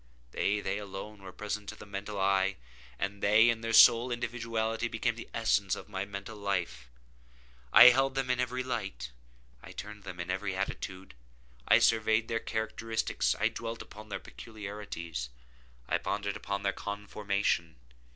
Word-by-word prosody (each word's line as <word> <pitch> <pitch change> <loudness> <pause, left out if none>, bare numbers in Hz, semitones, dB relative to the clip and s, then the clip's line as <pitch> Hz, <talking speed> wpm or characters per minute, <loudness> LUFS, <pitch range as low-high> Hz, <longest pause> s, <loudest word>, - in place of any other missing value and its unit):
They—they 100 0 0
alone 100 +1 -8
were 95 -1 -9
present 105 +1 -4
to - - -7
the - - -11
mental 100 0 -5
eye, 95 0 +2 0.4
and 100 +1 -3
they, 110 +3 +6
in 115 -1 -4
their 115 0 -2
sole 115 +2 +8
individuality, 115 -1 -2
became 120 0 0
the 115 - -10
essence 100 -4 +1
of - - -10
my 95 -1 -3
mental 100 +2 -7
life. 95 -10 -2 0.8
I 125 - +11
held 135 +2 +2
them 135 -1 0
in 125 - 0
every 125 +1 -1
light. 95 - -4 0.5
I - - -11
turned 105 0 -8
them 90 - -8
in 85 +1 -3
every 95 0 -2
attitude. 95 -1 -4 0.5
I - - +7
surveyed 110 0 +3
their 115 0 0
characteristics. 110 0 -1
I - - +3
dwelt 115 0 -5
upon 110 +1 -12
their - - -3
peculiarities. 100 - -7 0.6
I - - +1
pondered 100 0 -2
upon 100 -1 -3
their 100 -1 +1
conformation. 100 -5 -2
105 Hz, 155 wpm, -31 LUFS, 100-115 Hz, 0.8 s, I